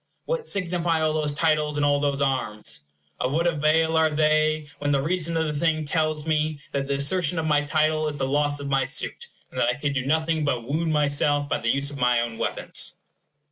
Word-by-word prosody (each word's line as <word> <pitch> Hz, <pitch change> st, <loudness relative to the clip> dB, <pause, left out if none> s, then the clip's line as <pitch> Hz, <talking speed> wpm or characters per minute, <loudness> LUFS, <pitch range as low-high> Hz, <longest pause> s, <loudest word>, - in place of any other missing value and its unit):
What -, -, -2 dB
signify 175 Hz, -3 st, 0 dB
all 155 Hz, -1 st, +1 dB
those 155 Hz, -1 st, 0 dB
titles, 150 Hz, 0 st, +1 dB
and 145 Hz, -, +2 dB
all 145 Hz, 0 st, +3 dB
those 140 Hz, -1 st, -1 dB
arms? 110 Hz, -, 0 dB, 0.4 s
Of 125 Hz, +2 st, -1 dB
what 165 Hz, +3 st, +1 dB
avail 160 Hz, 0 st, +2 dB
are 160 Hz, 0 st, +4 dB
they, 155 Hz, 0 st, +2 dB
when 145 Hz, -, -1 dB
the 140 Hz, -1 st, +2 dB
reason 165 Hz, +2 st, -1 dB
of 160 Hz, -, +1 dB
the 150 Hz, -, -2 dB
thing 155 Hz, +1 st, 0 dB
tells 155 Hz, 0 st, 0 dB
me 155 Hz, -1 st, 0 dB
that 135 Hz, -1 st, -2 dB
the 140 Hz, -, 0 dB
assertion 165 Hz, +4 st, +1 dB
of 160 Hz, -, -1 dB
my 150 Hz, -2 st, +3 dB
title 155 Hz, +1 st, +1 dB
is 150 Hz, -1 st, -4 dB
the 135 Hz, -, -1 dB
loss 145 Hz, +1 st, +1 dB
of 140 Hz, -, -5 dB
my 135 Hz, -1 st, +2 dB
suit, -, -, -3 dB, 0.2 s
and -, -, -5 dB
that 120 Hz, -, +3 dB
I 125 Hz, -, 0 dB
could 145 Hz, 0 st, -2 dB
do 135 Hz, -2 st, -1 dB
nothing 160 Hz, +3 st, 0 dB
but 130 Hz, -5 st, 0 dB
wound 160 Hz, +3 st, 0 dB
myself 145 Hz, -1 st, +1 dB
by -, -, -1 dB
the 115 Hz, -, -1 dB
use 140 Hz, +3 st, +1 dB
of 140 Hz, -, -8 dB
my 125 Hz, -1 st, +3 dB
own 120 Hz, -1 st, -3 dB
weapons? -, -, -2 dB
150 Hz, 220 wpm, -24 LUFS, 140-160 Hz, 0.4 s, are